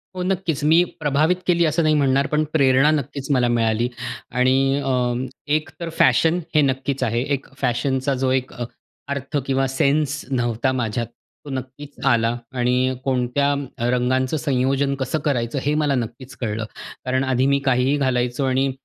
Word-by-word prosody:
हो, 180 - -3
नक्कीच. 180 -6 -1
मी 160 +3 +5 0.2
प्रभावित 155 +3 +2
केली 170 -1 +3
असं 160 +2 +1
नाही 155 0 +3
म्हणणार, 140 -1 +2
पण 150 0 +1
प्रेरणा 135 -1 +4
नक्कीच 140 -2 -3
मला 125 -3 +3
मिळाली 115 0 +1 0.4
आणि 135 +2 +2
अ, 125 -2 +1 0.4
एक 155 0 0
तर 170 -1 -4
फॅशन 160 +7 +4 0.2
हे 150 - +6
नक्कीच 135 -1 0
आहे. 115 -1 0
एक 135 -1 -3
फॅशनचा 130 +1 0
जो 130 - +2
एक 130 0 -1
अ, 120 - -4 0.4
अर्थ 140 +1 -3
किंवा 135 0 +1
सेन्स 145 +2 +1
नव्हता 120 0 0
माझ्यात, 120 -2 -2 0.4
तो - - -8
नक्कीच 135 +2 -7
आला 115 -2 +3 0.2
आणि 125 +1 +2
कोणत्या 135 +2 +1 0.3
अ, 120 +1 0
रंगांच 130 +3 +1
संयोजन 135 0 +1
कसं 135 +3 -2
करायचं 125 -2 0
हे 145 - +1
मला 145 -2 +1
नक्कीच 125 +2 -5
कळलं. 110 -1 -2 0.4
कारण 130 +1 +1
आधी 130 -1 +1
मी 140 0 +3
काहीही 130 +2 +2
घालायचो 125 -1 0
आणि 135 +1 +1
135 Hz, 160 wpm, -22 LUFS, 125-145 Hz, 0.4 s, हे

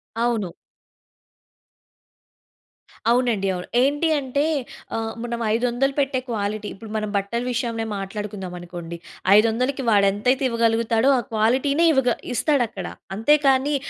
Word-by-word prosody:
అవును. 230 -5 0 2.6
అవునండి, 240 -5 +1
అవును. 180 0 -5
ఏంటి 290 +5 +2
అంటే 280 +1 -1 0.5
ఆహ్, 225 0 -3
మనం 235 -1 -3
500 245 +4 +1
పెట్టే 275 -2 +1
క్వాలిటీ 210 -1 -2
ఇప్పుడు 220 +2 -11
మనం 215 -1 -2
బట్టల 200 +4 -2
విషయం‌నే 230 -2 -2
మాట్లాడుకుందాం 195 -1 -5
అనుకోండి. 175 -1 -8 0.4
500కి 245 +6 +2
వాడు 205 -2 +4
ఎంతైతే 250 +7 +1
ఇవ్వగలుగుతాడో 230 +1 +2
ఆ - - +2
క్వాలిటీ‌నే 260 +8 +2
ఇవగ 265 -3 +2 0.2
ఇస్తాడు 280 +2 +2
అక్కడ. 190 -4 -7 0.3
అంతే 225 +9 +4
కానీ 270 +2 +3
230 Hz, 115 wpm, -23 LUFS, 210-260 Hz, 2.6 s, వాడు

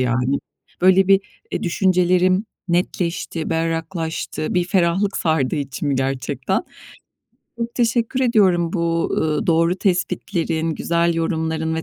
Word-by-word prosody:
yani. 125 +2 +1 0.4
Böyle, 190 +1 +5
bir, 195 0 +6 0.3
eee, - - -2
düşüncelerim 185 +2 +2 0.2
netleşti, 170 -2 -1
berraklaştı. 165 0 -2
Bir 180 - +2
ferahlık 185 +2 +1
sardı 155 -6 +1
içimi 140 0 -2
gerçekten. 135 0 -1 1.0
Çok 235 0 -4
teşekkür 240 +1 +1
ediyorum 190 -9 +3
bu, 170 -2 0
eee, 155 -1 -1
doğru 165 +1 +3
tespitlerin, 175 -3 -1
güzel 170 0 +1
yorumların 160 -1 -1
ve 160 - -2
170 Hz, 110 wpm, -21 LUFS, 160-185 Hz, 1.0 s, bir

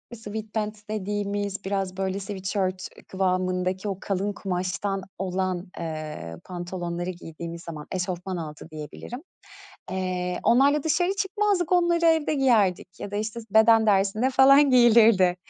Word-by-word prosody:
Sweatpants 215 0 -5
dediğimiz 205 -1 -3
biraz 190 -1 -2
böyle 190 0 -1
sweatshirt 190 -1 -3 0.2
kıvamındaki 185 +1 -1
o 190 - -3
kalın 200 +1 -1
kumaştan 190 +1 -2 0.2
olan, 185 -1 -2
eee, 155 - -5
pantolonları 175 0 -4
giydiğimiz 170 -1 -8
zaman, 155 -3 -8
eşofman 185 0 -3
altı 155 0 -7
diyebilirim. 155 - -8 0.7
Eee, 180 -1 -2
onlarla 280 +4 +4
dışarı 350 +4 +1
çıkmazdık, 390 -3 0
onları 345 -1 +3
evde 320 -2 +3
giyerdik 210 -9 +1
ya 200 - -5
da 205 - -4
işte, 220 +2 -3
s 225 - -14
beden 220 +1 +5
dersinde 205 +5 +2
falan 275 +2 +6
giyilirdi, 225 -7 +6
195 Hz, 125 wpm, -25 LUFS, 180-225 Hz, 0.7 s, falan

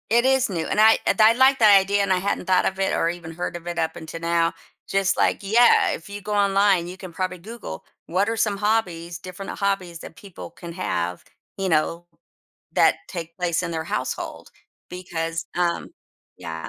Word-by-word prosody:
It 235 +2 +3
is 265 -2 +3
new 170 -4 -2
and - - -1
I 220 +1 +7
th - - +2
I 220 +1 +7
like 265 +2 +4
that 210 -3 +8
idea 200 +1 +1
and 200 -1 0
I 185 - +4
hadn't 195 0 -2
thought 185 0 +3
of 190 - -2
it 195 - +1
or 165 - +1
even 170 -1 -6
heard 175 +2 -4
of 175 0 -8
it 175 0 -3
up 160 -1 -1
until 160 0 -8
now. 170 0 +1 0.4
Just 195 0 +1
like, - - +1
yeah, 225 +5 +4
if 165 - -6
you 205 0 -7
go 210 +2 -4
online, 195 -3 +3
you 180 +1 -8
can 185 -3 -10
probably 185 +1 -3
Google 195 - -9 0.2
what 190 +4 +1
are 225 - -1
some 215 -3 0
hobbies, 180 -6 -1
different 185 +2 -8
hobbies 195 -4 -1
that 160 - -11
people 195 -5 -10
can 170 0 -10
have, 90 - -3 0.3
you 195 -1 -1
know, 165 +2 0 0.7
that - - +4
take 170 -2 -7
place 175 -1 -1
in 170 - -4
their 160 -1 -2
household - - -4 0.4
because, 165 -2 -4
um, 175 -1 0 0.5
yeah. 80 0 -6
185 Hz, 200 wpm, -23 LUFS, 170-200 Hz, 0.7 s, that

